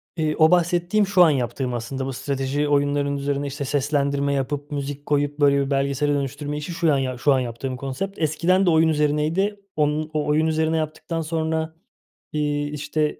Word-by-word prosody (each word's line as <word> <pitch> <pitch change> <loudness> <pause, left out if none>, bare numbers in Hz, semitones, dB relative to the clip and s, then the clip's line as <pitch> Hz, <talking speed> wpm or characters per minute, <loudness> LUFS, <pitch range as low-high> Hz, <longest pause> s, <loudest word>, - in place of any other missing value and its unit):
Eee, 155 -2 0
o 160 +2 +5
bahsettiğim, 175 +4 +2
şu 185 -2 +5
an 165 - +6
yaptığım 125 -1 -1
aslında 130 +3 -4
bu 135 - -4
strateji 140 +2 -2
oyunlarının 145 0 +1
üzerine 140 0 -2
işte 140 +1 -4
seslendirme 140 0 0
yapıp, 145 +2 -3
müzik 145 0 -4
koyup 145 0 0
böyle 140 -1 +4
bir 140 - -6
belgesele 140 +1 +1
dönüştürme 145 +1 -3
işi 150 +3 -5
şu 165 -3 +2
an - - +2
ya 130 -2 -2
şu 135 +2 +3
an 130 - +2
yaptığım 125 +1 -4
konsept. 175 +10 -5
Eskiden 170 +5 +2
de - - +4
oyun 160 0 +4
üzerineydi. 155 +7 +1 0.2
Onun 155 +1 0
o 150 -1 0
oyun 155 +2 +2
üzerine 160 0 +1
yaptıktan 160 +1 -3
sonra, 160 0 -2 0.6
iii, 145 -1 -1
işte, 150 +1 -1
145 Hz, 180 wpm, -23 LUFS, 140-160 Hz, 0.6 s, an